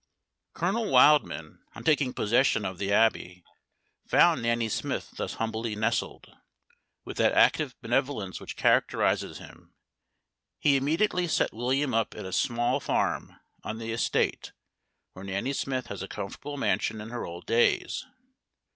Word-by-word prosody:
Colonel 200 Hz, +6 st, -1 dB
Wildman, 145 Hz, +4 st, +4 dB, 0.2 s
on -, -, -9 dB
taking 145 Hz, -5 st, +2 dB
possession 120 Hz, -1 st, +2 dB
of 95 Hz, -1 st, -5 dB
the 100 Hz, 0 st, -2 dB
Abbey, 95 Hz, -5 st, +1 dB, 0.6 s
found -, -, +4 dB
Nanny 115 Hz, 0 st, +1 dB
Smith 110 Hz, -, -3 dB
thus -, -, -4 dB
humbly 110 Hz, 0 st, -3 dB
nestled. 110 Hz, +3 st, -1 dB, 0.8 s
With -, -, -7 dB
that -, -, +3 dB
active 145 Hz, -5 st, +3 dB
benevolence 120 Hz, -5 st, -1 dB
which -, -, -8 dB
characterizes -, -, +1 dB
him, -, -, -15 dB, 0.8 s
he 140 Hz, -2 st, +3 dB
immediately 170 Hz, +6 st, +1 dB
set -, -, +1 dB
William 130 Hz, +4 st, 0 dB
up 115 Hz, -1 st, 0 dB
in -, -, -7 dB
a 95 Hz, -, -6 dB
small 120 Hz, 0 st, +1 dB
farm -, -, -2 dB, 0.2 s
on 110 Hz, -, -5 dB
the 115 Hz, 0 st, -5 dB
estate, 115 Hz, -, -1 dB, 0.6 s
where 95 Hz, -, -10 dB
Nanny 100 Hz, +8 st, -2 dB
Smith 130 Hz, -2 st, -2 dB
has 100 Hz, -, -7 dB
a 95 Hz, -, -5 dB
comfortable 145 Hz, +11 st, -6 dB
mansion 110 Hz, -4 st, 0 dB
in 110 Hz, +2 st, -8 dB
her 120 Hz, -, -4 dB
old 85 Hz, +1 st, -8 dB
days. 115 Hz, +1 st, +1 dB
115 Hz, 140 wpm, -27 LUFS, 110-140 Hz, 0.8 s, Wildman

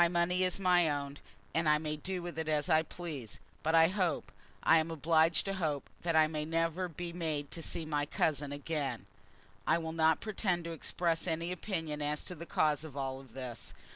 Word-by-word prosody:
My 175 Hz, -, +7 dB
money 175 Hz, +1 st, +1 dB
is 185 Hz, -1 st, +1 dB
my 180 Hz, -4 st, +4 dB
own, 145 Hz, -1 st, -3 dB, 0.3 s
and 160 Hz, -1 st, +2 dB
I 150 Hz, -, +6 dB
may 150 Hz, 0 st, -2 dB
do 180 Hz, +4 st, -4 dB
with 175 Hz, -2 st, -5 dB
it 160 Hz, -, -2 dB
as 155 Hz, +2 st, +1 dB
I 160 Hz, -1 st, +6 dB
please. 155 Hz, -, -7 dB, 0.2 s
But 160 Hz, +1 st, +2 dB
I 165 Hz, 0 st, +8 dB
hope, 185 Hz, -3 st, 0 dB, 0.3 s
I 165 Hz, -, +7 dB
am 160 Hz, +1 st, -1 dB
obliged 160 Hz, +1 st, +3 dB
to 195 Hz, -, -1 dB
hope, 155 Hz, -7 st, -2 dB
that 170 Hz, -1 st, 0 dB
I 155 Hz, 0 st, +7 dB
may 155 Hz, -1 st, -2 dB
never 165 Hz, +3 st, 0 dB
be 170 Hz, +1 st, -5 dB
made 155 Hz, -4 st, -2 dB
to 165 Hz, -, -4 dB
see 165 Hz, 0 st, -3 dB
my 145 Hz, -1 st, 0 dB
cousin 145 Hz, -2 st, 0 dB
again. 145 Hz, 0 st, -3 dB, 0.6 s
I -, -, +5 dB
will 160 Hz, -1 st, -4 dB
not 160 Hz, -1 st, +4 dB
pretend 190 Hz, -5 st, -1 dB
to 170 Hz, -, -5 dB
express 165 Hz, +1 st, -1 dB
any 165 Hz, +1 st, -1 dB
opinion 160 Hz, -5 st, -3 dB
as 150 Hz, 0 st, -1 dB
to -, -, -6 dB
the 170 Hz, 0 st, -9 dB
cause 150 Hz, -1 st, +2 dB
of 150 Hz, -3 st, -9 dB
all 135 Hz, -1 st, -3 dB
this. 125 Hz, -3 st, -8 dB
160 Hz, 205 wpm, -33 LUFS, 150-170 Hz, 0.6 s, I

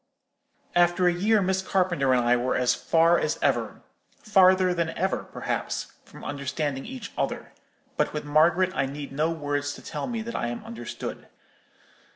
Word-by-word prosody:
After 175 Hz, +1 st, +4 dB
a 175 Hz, -, +4 dB
year 205 Hz, +4 st, +2 dB
Miss 190 Hz, 0 st, +1 dB
Carpenter 180 Hz, -8 st, +1 dB
and 125 Hz, -1 st, +3 dB
I 120 Hz, +1 st, +4 dB
were 125 Hz, +1 st, 0 dB
as 125 Hz, -1 st, +3 dB
far 165 Hz, +1 st, +3 dB
as 155 Hz, -, -1 dB
ever—farther 185 Hz, -3 st, +1 dB
than 170 Hz, -1 st, -1 dB
ever, 190 Hz, +2 st, -1 dB
perhaps—from -, -, -5 dB
understanding 140 Hz, 0 st, -3 dB
each 260 Hz, -1 st, -7 dB
other; -, -, -3 dB, 0.5 s
but -, -, +1 dB
with 150 Hz, -1 st, -4 dB
Margaret 170 Hz, +5 st, +3 dB
I 135 Hz, -8 st, 0 dB
need 140 Hz, +1 st, -7 dB
no 150 Hz, +4 st, 0 dB
words 145 Hz, -3 st, -2 dB
to -, -, -13 dB
tell 150 Hz, -3 st, -4 dB
me 230 Hz, -2 st, -3 dB
that 235 Hz, +1 st, -6 dB
I -, -, -1 dB
am 120 Hz, 0 st, -5 dB
understood. 120 Hz, +1 st, -7 dB
165 Hz, 160 wpm, -26 LUFS, 140-185 Hz, 0.5 s, After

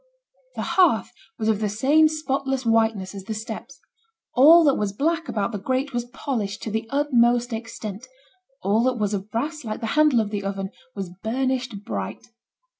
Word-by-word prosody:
The -, -, -3 dB
hearth 350 Hz, -, +3 dB, 0.3 s
was 220 Hz, -, -2 dB
of 220 Hz, -2 st, +2 dB
the 215 Hz, -1 st, 0 dB
same 280 Hz, +9 st, +4 dB
spotless 270 Hz, -4 st, -2 dB
whiteness 225 Hz, -4 st, +1 dB
as 195 Hz, -1 st, -8 dB
the 220 Hz, -, -4 dB
steps; 225 Hz, +5 st, -7 dB, 0.5 s
all 320 Hz, +6 st, +8 dB
that 285 Hz, -3 st, +5 dB
was 205 Hz, -4 st, -1 dB
black 330 Hz, +8 st, 0 dB
about 210 Hz, +1 st, -1 dB
the 205 Hz, -, -4 dB
grate 260 Hz, +6 st, -1 dB
was 240 Hz, 0 st, -1 dB
polished 230 Hz, -5 st, -4 dB
to 220 Hz, -, -4 dB
the 220 Hz, +1 st, -2 dB
utmost 245 Hz, -4 st, +2 dB
extent; 220 Hz, 0 st, -6 dB, 0.6 s
all 205 Hz, +4 st, +3 dB
that 255 Hz, -1 st, +1 dB
was 210 Hz, -2 st, -1 dB
of 200 Hz, +1 st, -3 dB
brass, 300 Hz, +8 st, -3 dB
like 215 Hz, -2 st, -4 dB
the 230 Hz, -, -4 dB
handle 305 Hz, -5 st, +4 dB
of 210 Hz, -2 st, -1 dB
the 205 Hz, -2 st, -3 dB
oven, 195 Hz, -1 st, -3 dB, 0.2 s
was 195 Hz, -3 st, -5 dB
burnished 250 Hz, -2 st, -2 dB
bright. 95 Hz, -, -5 dB
230 Hz, 180 wpm, -24 LUFS, 210-270 Hz, 0.6 s, all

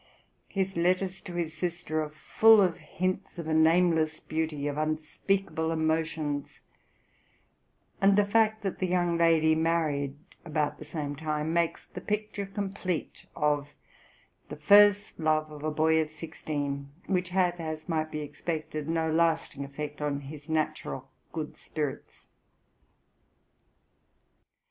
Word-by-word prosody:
His 195 Hz, -1 st, -2 dB
letters 185 Hz, +2 st, +1 dB
to 180 Hz, -, -8 dB
his 165 Hz, -2 st, -2 dB
sister 175 Hz, -3 st, -2 dB
are 155 Hz, -, -3 dB
full 220 Hz, +8 st, +5 dB
of 180 Hz, -4 st, +3 dB
hints 185 Hz, +1 st, -3 dB
of 170 Hz, -2 st, -5 dB
a 160 Hz, -, 0 dB
nameless 160 Hz, -1 st, +4 dB
beauty, 155 Hz, -2 st, -2 dB
of 145 Hz, -1 st, -1 dB
unspeakable 160 Hz, +3 st, -1 dB
emotions; 160 Hz, -2 st, -1 dB, 1.4 s
and 195 Hz, 0 st, +6 dB
the 205 Hz, 0 st, +4 dB
fact 220 Hz, +1 st, +2 dB
that 195 Hz, -, -3 dB
the 185 Hz, -, 0 dB
young 175 Hz, -1 st, +1 dB
lady 165 Hz, -1 st, +4 dB
married 155 Hz, -4 st, 0 dB, 0.3 s
about 155 Hz, -3 st, -1 dB
the 150 Hz, -, -8 dB
same 150 Hz, -2 st, -3 dB
time 155 Hz, +1 st, -2 dB
makes 170 Hz, -1 st, 0 dB
the 180 Hz, -, -9 dB
picture 210 Hz, -1 st, -2 dB
complete 195 Hz, -4 st, -4 dB
of 145 Hz, -1 st, 0 dB, 0.7 s
the -, -, -5 dB
first 205 Hz, +6 st, +5 dB
love 155 Hz, -1 st, +1 dB
of 150 Hz, -1 st, -9 dB
a 155 Hz, -, 0 dB
boy 160 Hz, +1 st, +3 dB
of 155 Hz, -, -3 dB
sixteen, 145 Hz, -3 st, -4 dB, 0.2 s
which 180 Hz, -2 st, 0 dB
had, 180 Hz, -1 st, +1 dB
as 155 Hz, -1 st, -5 dB
might 160 Hz, -2 st, 0 dB
be 155 Hz, -1 st, -4 dB
expected, 155 Hz, 0 st, -4 dB
no 160 Hz, -1 st, +1 dB
lasting 160 Hz, -3 st, +1 dB
effect 145 Hz, +1 st, -6 dB
on 145 Hz, -1 st, -1 dB
his 145 Hz, +2 st, -10 dB
natural 155 Hz, -1 st, -2 dB, 0.2 s
good -, -, -5 dB
spirits. -, -, -5 dB
160 Hz, 135 wpm, -29 LUFS, 155-180 Hz, 1.4 s, and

